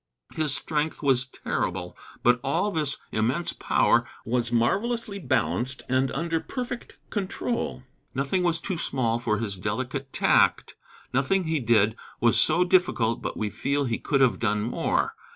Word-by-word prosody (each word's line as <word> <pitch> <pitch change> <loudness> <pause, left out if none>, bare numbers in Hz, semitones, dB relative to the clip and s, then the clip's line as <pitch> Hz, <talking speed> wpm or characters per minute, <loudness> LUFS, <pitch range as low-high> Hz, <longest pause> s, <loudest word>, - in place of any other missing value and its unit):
His 150 -3 -1
strength 155 +1 -2
was 135 -2 +3
terrible. 90 -7 -3 0.3
But 120 0 +5
all 170 +9 +1
this 150 -6 0
immense 120 +11 0
power - - +2 0.2
was 115 0 0
marvelously 200 - 0
balanced 125 - -1
and 130 +1 +2
under 165 +2 -1
perfect 245 +5 -6
control. 200 - -2 0.3
Nothing 140 +8 0
was 170 -2 +1
too 185 -5 -3
small 120 -3 0
for 110 -2 0
his 100 -3 -3
delicate 130 +7 -3
tact. - - +3 0.4
Nothing 140 +9 +2
that 160 - -5
he 160 -1 +1
did 110 -3 +3 0.2
was 120 -1 +4
so 180 - +5
difficult 175 -11 +2
but - - -4
we 105 -1 -2
feel 140 +1 0
he 115 -3 -1
could 140 -2 +1
have 130 -2 +3
done 105 -2 +1
more. 120 - 0
135 Hz, 150 wpm, -26 LUFS, 115-165 Hz, 0.4 s, But